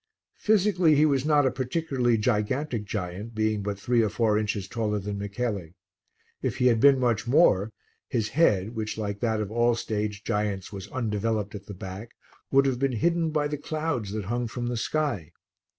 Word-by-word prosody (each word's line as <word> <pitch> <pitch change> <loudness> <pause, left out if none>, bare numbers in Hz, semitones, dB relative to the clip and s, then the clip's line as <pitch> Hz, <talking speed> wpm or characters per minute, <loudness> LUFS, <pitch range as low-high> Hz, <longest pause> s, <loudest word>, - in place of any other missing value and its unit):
Physically 190 -6 +3
he 150 +2 +5
was 140 -2 +1
not 150 -2 +4
a 130 - +3
particularly 130 -3 0
gigantic 115 +2 0
giant, 100 +3 -5
being 110 -1 0
but 100 0 -3
three 120 +4 +2
or 110 - +2
four 110 0 +1
inches 105 -2 -1
taller 105 -1 -1
than 100 0 -4
Michele. 100 -2 -3 0.7
If - - -2
he 125 - +1
had 120 -3 +4
been 140 +2 +6
much 120 -2 +1
more, 115 - +4 0.4
his 110 -3 -1
head, 110 - +2
which 110 -2 -4
like 100 -2 -3
that 110 -1 0
of 105 -1 -3
all 120 +1 +3
stage 105 -2 -3
giants 105 -2 -2
was 100 0 -7
undeveloped 110 -2 -2
at 100 -1 -9
the 100 - -7
back, 95 +5 -8 0.3
would 135 0 +4
have 130 -3 0
been 135 -1 +1
hidden 165 +6 +1
by 150 -1 0
the 150 -1 -4
clouds 145 -9 -2
that 105 -2 -3
hung 120 +3 -1
from 120 +1 -4
the 120 - -2
sky. 115 - -1
115 Hz, 185 wpm, -26 LUFS, 105-135 Hz, 0.7 s, been